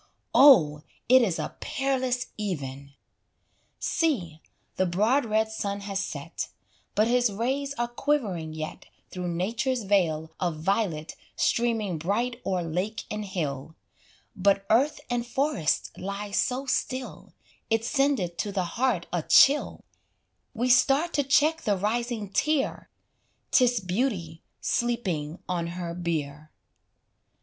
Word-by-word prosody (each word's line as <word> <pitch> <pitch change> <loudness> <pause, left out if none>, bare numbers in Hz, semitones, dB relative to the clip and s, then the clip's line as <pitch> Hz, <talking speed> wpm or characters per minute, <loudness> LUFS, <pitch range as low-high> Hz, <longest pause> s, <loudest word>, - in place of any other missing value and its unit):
Oh, 160 - +7 0.3
it 255 +1 +7
is 190 -8 +1
a 155 - -4
peerless 260 -2 -1
even! 140 -9 -5 0.9
See, 185 - -1 0.3
the 185 - +1
broad 220 +10 +2
red 220 0 +1
sun 200 -2 -3
has 200 -1 -3
set, 195 - -4 0.5
But 215 +1 +3
his 245 -2 +3
rays 270 +7 -2
are 240 -2 -1
quivering 235 - -1
yet 155 +4 -6 0.2
Through 180 -1 -4
Nature's 225 +8 -1
vale 165 -6 +1
of 175 -3 -1
violet 165 -3 -1 0.2
Streaming 225 -7 0
bright 235 +8 -1
o'er 185 -2 0
lake 180 +7 -3
and 210 0 -3
hill, 155 -6 -4 0.6
But 195 0 +2
earth 275 +6 +3
and 245 -1 -1
forest 265 - -1
lie 200 +2 -5
so 250 +5 0
still, 260 -1 -3 0.4
It 225 0 +1
sendeth 250 -11 +1
to 205 - -2
the 190 -2 0
heart 225 -1 0
a 175 - +1
chill; 280 - +4 0.7
We 245 +3 0
start 275 +7 +4
to 285 - +2
check 300 +4 +3
the 205 -2 +1
rising 220 +1 -2
tear 300 +4 0 0.6
'Tis 245 -2 +4
beauty 180 -4 -2 0.2
sleeping 185 -10 -1
on 175 -2 -1
her 170 -2 -4
bier. 155 -4 -3
205 Hz, 125 wpm, -27 LUFS, 175-250 Hz, 0.9 s, Oh